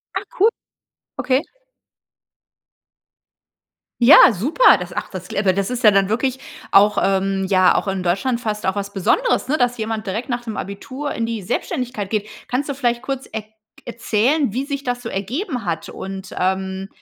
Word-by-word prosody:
Ah, -, -, -2 dB
cool. 420 Hz, +4 st, +5 dB, 0.7 s
Okay. 260 Hz, +2 st, +2 dB, 2.6 s
Ja, 250 Hz, +1 st, +9 dB
super, 250 Hz, -, +4 dB
das, 180 Hz, 0 st, -7 dB
ach, -, -, -4 dB
das 185 Hz, -1 st, -8 dB
kl -, -, -8 dB
äh 185 Hz, -, +4 dB
das 195 Hz, 0 st, -1 dB
ist 250 Hz, -1 st, -4 dB
ja 215 Hz, -, +8 dB
dann 195 Hz, -1 st, +3 dB
wirklich 255 Hz, +5 st, -1 dB, 0.3 s
auch, 205 Hz, +1 st, +5 dB
ähm 195 Hz, 0 st, +1 dB
ja, 185 Hz, -2 st, +4 dB
auch -, -, 0 dB
in 190 Hz, -1 st, -2 dB
Deutschland 195 Hz, +8 st, 0 dB
fast 215 Hz, -2 st, -3 dB
auch 190 Hz, +2 st, 0 dB
was 200 Hz, 0 st, -4 dB
Besonderes, 360 Hz, -, +1 dB
ne, 305 Hz, -, +2 dB
dass 245 Hz, -2 st, +1 dB
jemand 220 Hz, -1 st, -4 dB
direkt 220 Hz, +8 st, -3 dB
nach 245 Hz, -1 st, -1 dB
dem 225 Hz, -3 st, -6 dB
Abitur 260 Hz, +9 st, -5 dB
in 230 Hz, -, -2 dB
die 230 Hz, -2 st, -4 dB
Selbständigkeit 240 Hz, -, -3 dB
geht. 215 Hz, 0 st, -2 dB, 0.2 s
Kannst 275 Hz, +4 st, -2 dB
du -, -, -1 dB
vielleicht 240 Hz, -3 st, 0 dB
kurz 270 Hz, 0 st, -4 dB
erk 215 Hz, -1 st, -6 dB, 0.4 s
erzählen, 235 Hz, +3 st, 0 dB
wie 260 Hz, +3 st, -1 dB
sich 280 Hz, -1 st, -5 dB
das 245 Hz, 0 st, -2 dB
so 230 Hz, -, -6 dB
ergeben 245 Hz, -, -3 dB
hat 165 Hz, -2 st, -3 dB
und, 190 Hz, 0 st, -7 dB
ähm, 190 Hz, +1 st, -1 dB
220 Hz, 175 wpm, -20 LUFS, 195-255 Hz, 2.6 s, Ja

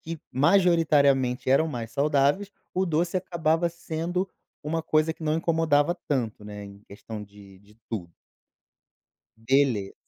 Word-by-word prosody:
que 165 Hz, 0 st, -6 dB
majoritariamente 140 Hz, -6 st, +3 dB
eram 160 Hz, +4 st, +4 dB
mais 115 Hz, -5 st, -5 dB
saudáveis, 145 Hz, +7 st, +1 dB, 0.2 s
o 185 Hz, +1 st, 0 dB
doce 170 Hz, +2 st, 0 dB
acabava 170 Hz, -2 st, 0 dB
sendo 170 Hz, +2 st, -3 dB, 0.4 s
uma 160 Hz, +2 st, -2 dB
coisa 155 Hz, 0 st, +2 dB
que 165 Hz, -, -15 dB
não 155 Hz, 0 st, +1 dB
incomodava 165 Hz, -1 st, +2 dB
tanto, 115 Hz, -7 st, -2 dB
né, 105 Hz, 0 st, -8 dB
em 100 Hz, 0 st, -12 dB
questão 105 Hz, +1 st, -8 dB
de 100 Hz, -2 st, -15 dB
de 105 Hz, +2 st, -23 dB
tudo. 85 Hz, -7 st, -5 dB, 1.3 s
Beleza. 120 Hz, -4 st, +1 dB
145 Hz, 130 wpm, -26 LUFS, 115-165 Hz, 1.3 s, eram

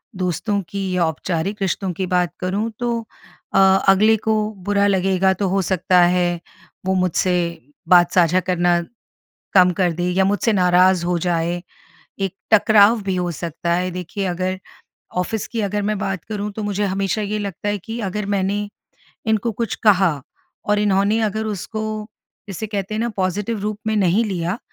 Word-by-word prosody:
दोस्तों 185 Hz, +3 st, -1 dB
की 195 Hz, +1 st, -3 dB
या 175 Hz, -2 st, +2 dB
औपचारिक 170 Hz, +5 st, -3 dB
रिश्तों 190 Hz, 0 st, -1 dB
की 190 Hz, +3 st, -3 dB
बात 180 Hz, -1 st, +1 dB
करूँ। 195 Hz, +5 st, -1 dB
तो 235 Hz, -1 st, -1 dB, 0.5 s
अ, -, -, +2 dB, 0.3 s
अगले 210 Hz, +3 st, +5 dB
को 220 Hz, +1 st, 0 dB, 0.3 s
बुरा 205 Hz, 0 st, +2 dB
लगेगा 190 Hz, -1 st, +2 dB
तो 195 Hz, +1 st, -2 dB
हो 195 Hz, +1 st, +1 dB
सकता 185 Hz, 0 st, +2 dB
है, 175 Hz, 0 st, +2 dB, 0.5 s
वो 190 Hz, -, +1 dB
मुझसे 180 Hz, -1 st, 0 dB, 0.3 s
बात 175 Hz, -1 st, +6 dB
साझा 180 Hz, 0 st, +4 dB
करना, 175 Hz, -1 st, +1 dB, 0.7 s
कम 180 Hz, -2 st, +6 dB
कर 180 Hz, -2 st, +2 dB
दे 175 Hz, +2 st, -3 dB
या 190 Hz, +2 st, +2 dB
मुझसे 205 Hz, +3 st, +1 dB
नाराज़ 180 Hz, -1 st, +4 dB
हो 175 Hz, 0 st, +1 dB
जाए, 175 Hz, 0 st, -1 dB, 0.6 s
एक 195 Hz, -2 st, -1 dB, 0.2 s
टकराव 215 Hz, +1 st, +5 dB
भी 190 Hz, -1 st, -1 dB
हो 180 Hz, -1 st, -1 dB
सकता 170 Hz, +1 st, -3 dB
है। 180 Hz, +1 st, -1 dB
देखिए 180 Hz, +2 st, -4 dB
अगर 185 Hz, +1 st, -2 dB, 0.6 s
ऑफिस 190 Hz, +4 st, -1 dB
की 230 Hz, -, -3 dB
अगर 205 Hz, 0 st, -1 dB
मैं 210 Hz, 0 st, -1 dB
बात 195 Hz, -4 st, -3 dB
करूँ, 210 Hz, -1 st, -4 dB
तो 215 Hz, -, -5 dB
मुझे 205 Hz, 0 st, -1 dB
हमेशा 195 Hz, +1 st, -1 dB
ये 210 Hz, +1 st, -2 dB
लगता 200 Hz, -1 st, -4 dB
है 205 Hz, 0 st, 0 dB
कि 225 Hz, +5 st, -7 dB
अगर 210 Hz, +2 st, -3 dB
मैंने, 200 Hz, +1 st, -1 dB, 0.6 s
इनको 220 Hz, +1 st, +1 dB
कुछ 230 Hz, +1 st, -2 dB
कहा 190 Hz, -5 st, +5 dB, 0.5 s
और 210 Hz, 0 st, +1 dB
इन्होंने 205 Hz, +1 st, +2 dB
अगर 220 Hz, 0 st, -1 dB
उसको, 215 Hz, +1 st, -4 dB, 0.4 s
जिसे 200 Hz, +3 st, -5 dB
कहते 205 Hz, -1 st, -4 dB
हैं 215 Hz, -, -1 dB
ना 235 Hz, -, 0 dB
पॉज़िटिव 200 Hz, +4 st, -1 dB
रूप 210 Hz, +1 st, -3 dB
में 220 Hz, 0 st, +1 dB
नहीं 200 Hz, +3 st, +3 dB
लिया, 185 Hz, -1 st, -2 dB
195 Hz, 170 wpm, -20 LUFS, 180-210 Hz, 0.7 s, बात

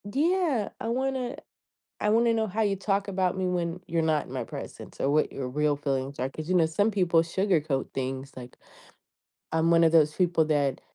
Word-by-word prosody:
Yeah, 295 Hz, -, +1 dB
I -, -, -4 dB
wanna 260 Hz, +1 st, -1 dB, 0.7 s
I 210 Hz, -, 0 dB
wanna 230 Hz, +2 st, +4 dB
know 220 Hz, -1 st, 0 dB
how 215 Hz, +3 st, -1 dB
you 200 Hz, -2 st, +1 dB
talk 200 Hz, +1 st, -1 dB
about 185 Hz, -2 st, 0 dB
me 190 Hz, -1 st, -1 dB
when 175 Hz, -1 st, -2 dB
you're 165 Hz, -1 st, 0 dB
not 155 Hz, -2 st, +1 dB
in -, -, -11 dB
my -, -, -3 dB
presence, -, -, -9 dB
or 135 Hz, -, +1 dB
what 155 Hz, +1 st, +2 dB
your 130 Hz, -2 st, -4 dB
real 150 Hz, +2 st, +1 dB
feelings 140 Hz, -1 st, -3 dB
are, 130 Hz, -, 0 dB
'cause, 155 Hz, +3 st, -8 dB
you 185 Hz, -, +1 dB
know, 170 Hz, -3 st, +4 dB
some 205 Hz, +7 st, +1 dB
people 180 Hz, -5 st, +3 dB
sugarcoat 165 Hz, -6 st, 0 dB
things, 135 Hz, +1 st, -4 dB
like, 125 Hz, -1 st, -10 dB, 0.9 s
I'm 160 Hz, +1 st, +2 dB
one 165 Hz, 0 st, +5 dB
of 165 Hz, -, +5 dB
those 155 Hz, -2 st, +4 dB
people 175 Hz, -2 st, +2 dB
that 145 Hz, -3 st, 0 dB
170 Hz, 205 wpm, -27 LUFS, 150-205 Hz, 0.9 s, one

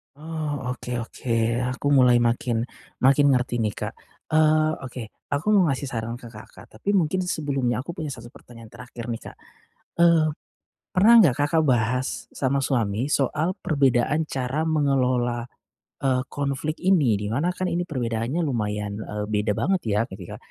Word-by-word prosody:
Oh, 150 Hz, -4 st, -4 dB
oke 125 Hz, 0 st, -7 dB
oke, 120 Hz, +1 st, -5 dB, 0.4 s
aku 125 Hz, -, -7 dB
mulai 125 Hz, -3 st, +6 dB
makin, 115 Hz, -1 st, 0 dB, 0.4 s
makin 140 Hz, +2 st, +5 dB
ngerti 125 Hz, -1 st, 0 dB
nih 105 Hz, -2 st, -1 dB
Kak. -, -, -4 dB, 0.4 s
Eee, 155 Hz, 0 st, +4 dB, 0.2 s
oke 125 Hz, -1 st, -6 dB, 0.3 s
aku 145 Hz, +7 st, -2 dB
mau 195 Hz, -, +5 dB
ngasih 140 Hz, 0 st, -1 dB
saran 115 Hz, 0 st, -3 dB
ke 120 Hz, -, -9 dB
Kakak, 110 Hz, -, -13 dB
tapi 110 Hz, -, -5 dB
mungkin 165 Hz, +3 st, 0 dB
sebelumnya 140 Hz, -8 st, -1 dB
aku 170 Hz, -, -6 dB
punya 155 Hz, -, -3 dB
1 115 Hz, 0 st, -11 dB
pertanyaan 115 Hz, -2 st, -14 dB
terakhir 120 Hz, -2 st, -9 dB
nih 115 Hz, -, -5 dB
Kak. -, -, -10 dB, 0.7 s
Eee, 170 Hz, -2 st, +5 dB, 0.7 s
pernah 205 Hz, +5 st, +6 dB
nggak 145 Hz, -10 st, +3 dB
Kakak 145 Hz, +3 st, +2 dB
bahas 125 Hz, -1 st, 0 dB
sama 135 Hz, 0 st, 0 dB
suami 120 Hz, -3 st, 0 dB
soal 150 Hz, +5 st, 0 dB
perbedaan 140 Hz, +1 st, +2 dB
cara 135 Hz, +3 st, -2 dB
mengelola, 130 Hz, -6 st, +1 dB, 0.6 s
eee, 130 Hz, -2 st, +2 dB
konflik 145 Hz, +2 st, -2 dB
ini, 155 Hz, -, +3 dB
di 105 Hz, -, -3 dB
mana 145 Hz, +11 st, 0 dB
kan 185 Hz, 0 st, -3 dB
ini 175 Hz, +1 st, -1 dB
perbedaannya 125 Hz, -1 st, -2 dB
lumayan, 105 Hz, -7 st, -2 dB
eee, 105 Hz, -1 st, -4 dB
beda 105 Hz, 0 st, +1 dB
banget 190 Hz, -, +1 dB
ya 105 Hz, 0 st, +1 dB
ketika, 95 Hz, -2 st, -8 dB
130 Hz, 155 wpm, -24 LUFS, 120-155 Hz, 0.7 s, mulai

